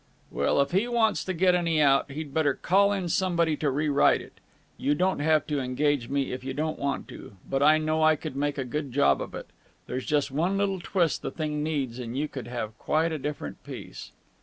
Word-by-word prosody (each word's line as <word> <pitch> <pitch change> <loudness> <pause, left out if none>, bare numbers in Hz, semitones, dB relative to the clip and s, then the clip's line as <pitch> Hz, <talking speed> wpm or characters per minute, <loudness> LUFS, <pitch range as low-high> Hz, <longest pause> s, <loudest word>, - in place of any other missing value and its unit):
"Well, - - +1
if 140 - -1
he 195 +6 +2
wants 230 -3 +1
to 190 - -2
get 180 +2 +4
any 170 -3 +1
out, 140 -1 +4
he'd 145 0 -6
better 145 -3 +2
call 200 +2 +3
in 195 -3 -1
somebody 170 -3 +1
to 150 - 0
rewrite 145 +1 +3
it. - - -14 0.4
You 145 +2 0
don't 185 +2 +1
have 155 0 +2
to 150 -3 -1
engage 130 0 0
me 140 -1 -1
if 125 0 -5
you 135 0 -4
don't 155 +1 -2
want 140 -1 -2
to. - - -10
But 135 0 -1
I 155 +2 +6
know 155 0 0
I 155 0 +5
could 135 - -7
make 145 +1 -1
a 135 - -2
good 145 +2 -4
job 140 +3 +3
of - - -6
it. - - -6 0.4
There's 130 - -5
just 145 -2 +1
one 175 +8 0
little 195 -1 0
twist 175 -2 0
the - - -3
thing 150 -2 -3
needs 140 -6 -2
and 120 0 -5
you 150 +2 0
would 130 -4 -6
have 115 -3 -5
quite 160 +2 +1
a 155 - -3
different 145 +2 -5
piece." - - -9
150 Hz, 225 wpm, -27 LUFS, 140-165 Hz, 0.4 s, I